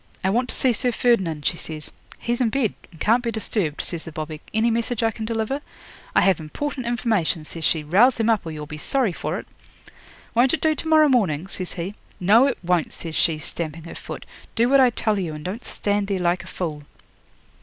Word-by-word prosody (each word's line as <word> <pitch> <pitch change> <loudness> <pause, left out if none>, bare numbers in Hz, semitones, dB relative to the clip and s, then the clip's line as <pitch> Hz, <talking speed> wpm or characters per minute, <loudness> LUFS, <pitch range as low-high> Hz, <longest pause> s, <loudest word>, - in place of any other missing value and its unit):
'"I 190 - +2
want 245 +4 +1
to - - +1
see 255 -2 +3
Sir 245 +2 +1
Ferdinand," 190 -12 +1
she 170 - +1
says. 155 -2 -5 0.3
'"He's 240 +1 -2
in 240 - +3
bed 230 -3 +1 0.2
and 165 - -17
can't 230 +7 +3
be 235 - -2
disturbed," 205 -8 -1
says 170 -2 -1
the 160 - -8
bobby. 155 0 -6
"Any 225 +2 +2
message 230 0 -1
I 225 - +3
can 220 +1 -5
deliver?" 230 +5 -1 0.5
'"I - - +6
have 190 -4 +4
important 255 - -4
information," 220 -10 0
says 165 +1 -8
she. 155 +1 +2
"Rouse 205 - +5
him 225 - +2
up, 225 -3 +3
or 165 - -6
you'll 150 -1 -6
be 150 +1 -8
sorry 245 - +1
for - - -3
it." - - -7 0.9
'"Won't 250 +5 +4
it 315 - -9
do 315 -1 +4
to 315 - -3
morrow 310 -1 +6
morning?" 190 - +2
says 185 -1 -4
he. 180 +3 -4 0.3
'"No, 220 +9 +6
it 275 - -1
won't," 175 -2 +1
says 165 -2 -7
she, 165 -3 +2
stamping 160 +1 -5
her 165 - -8
foot. - - -8 0.3
"Do 235 +1 +3
what 275 0 +6
I 255 -1 +7
tell 215 -3 0
you, 165 -5 -3
and 150 - -9
don't 210 +7 -4
stand 205 -1 -1
there 195 -1 0
like 175 0 +1
a - - -13
fool." 155 -5 -4
205 Hz, 225 wpm, -23 LUFS, 165-240 Hz, 0.9 s, I